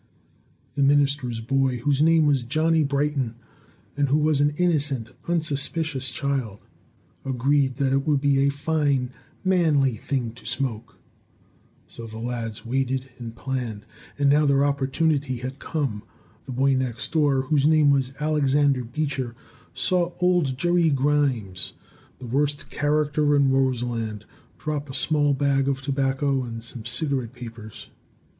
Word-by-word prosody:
The 145 - -2
minister's 140 -4 +2
boy, 130 +2 +1
whose 140 +3 +1
name 160 0 +5
was 140 -3 +3
Johnny 155 +6 +2
Brighton, 140 -4 -1 0.6
and 145 -1 +1
who 145 - +3
was 150 -2 +2
an 145 0 +2
innocent, 145 -9 0 0.2
unsuspicious 155 -3 -1
child, 135 -7 -2 0.7
agreed 135 +1 +1
that 135 0 0
it 135 +1 0
would 145 -2 +3
be 140 -1 +2
a 140 +1 +3
fine, 140 -3 0 0.3
manly 155 -9 +3
thing 120 +1 -2
to 120 - -17
smoke. 120 -6 -4 0.9
So 115 - -9
the 110 0 -9
lads 115 -2 -5
waited 130 +1 -1
and 115 -2 -7
planned, 120 -6 -4 0.3
and 145 -1 +2
now 145 +1 +4
their 140 0 +3
opportunity 140 -1 0
had 130 +3 -6
come. 135 -10 -2 0.4
The - - -7
boy 135 +2 +2
next 130 -3 -2
door, 145 -4 +2
whose 145 +1 +2
name 155 -2 +5
was 135 -1 0
Albert 145 -4 +1
Beecher, 135 -4 -2 0.4
saw 175 -1 0
old 175 -7 +2
Jerry 175 +2 +2
Grimes, 135 -9 0 0.4
the 130 - -10
worst 145 +4 -1
character 150 0 +1
in 140 -2 +3
Roseland, 120 -5 -1 0.3
drop 150 -2 -4
a 130 - -6
small 145 0 +2
bag 135 -1 +1
of 135 -1 -1
tobacco 135 0 0
and 115 -2 -6
some 120 -1 -8
cigarette 130 -2 -2
papers. 115 -4 -10
140 Hz, 140 wpm, -24 LUFS, 125-145 Hz, 0.9 s, name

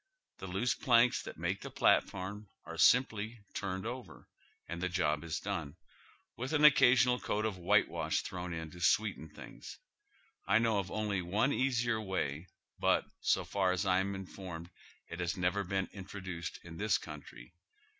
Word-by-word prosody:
The 95 - -6
loose 95 +7 0
planks 120 -1 +4
that - - -9
make - - -2
the - - -6
platform 100 +2 +1 0.2
are - - -7
simply 115 -3 +3
turned 95 0 -3
over, 125 +2 -7 0.4
and 85 0 -5
the 90 - 0
job 85 -4 0
is 80 -1 -3
done, 75 -3 -4 0.6
with 130 +5 -4
an 150 -1 +5
occasional 125 -3 +6
coat 105 +1 -1
of 100 -4 -2
white 100 +4 +4
wash 80 -2 -1
thrown 90 -1 -5
in 80 -1 -5
to 90 - -11
sweeten 100 -5 +1
things. 75 - -11 0.7
I 100 - +5
know 115 -2 +2
of 95 -1 -4
only 105 -3 -1
one 105 +11 +1
easier 120 -4 +1
way, 90 -5 -2 0.3
but, - - +3
so - - +1
far 95 -2 +1
as 90 0 -1
I 95 -1 +3
am 100 +1 -1
informed, 90 -3 -8 0.4
it 85 - -7
has 85 +1 -1
never 90 +3 +1
been 95 0 -1
introduced 95 -3 -6
in 80 -1 -10
this 105 +2 +2
country. 75 -4 -11
95 Hz, 165 wpm, -33 LUFS, 85-110 Hz, 0.7 s, occasional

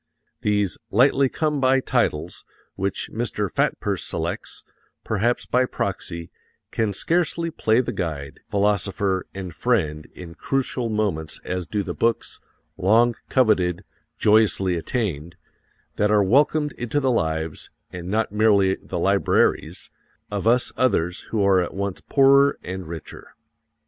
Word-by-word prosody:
These 105 -3 0
lightly 135 +4 +4
come 150 -1 -1
by 130 0 +4
titles, 90 -11 -1 0.3
which 95 0 -3
Mr. 105 -4 -2
Fatpurse - - -1
selects, - - -4 0.4
perhaps 115 +3 0
by 125 +1 +2
proxy, 85 -6 -4 0.4
can 110 -2 0
scarcely 165 - 0
play 115 -6 +2
the 125 - -4
guide, 75 -5 -5
philosopher 100 -1 0
and 95 -3 -6
friend 80 -12 0
in 85 -2 -9
crucial 130 +1 -2
moments 100 -8 -2
as 90 -1 -3
do 105 +1 -2
the - - -4
books 115 0 -1 0.4
long 110 +5 +4 0.2
coveted, 100 -9 +2 0.3
joyously 105 -4 +3
attained 85 - -3 0.6
that 105 - +2
are 105 -1 +4
welcomed 145 +7 +3
into 120 +4 -1
the 130 -2 +1
lives, 80 -6 -2 0.2
and 90 -1 -7
not 110 +1 0
merely 100 -3 +3
the - - -5
libraries, - - +1 0.4
of 100 +1 -2
us 120 +2 +3
others 90 -9 +1
who 110 -3 0
are 95 -2 +4
at 90 - -4
once 100 -1 -3
poorer 140 0 +4
and 95 -1 -6
richer. 80 -1 -9
105 Hz, 130 wpm, -23 LUFS, 90-120 Hz, 0.6 s, lightly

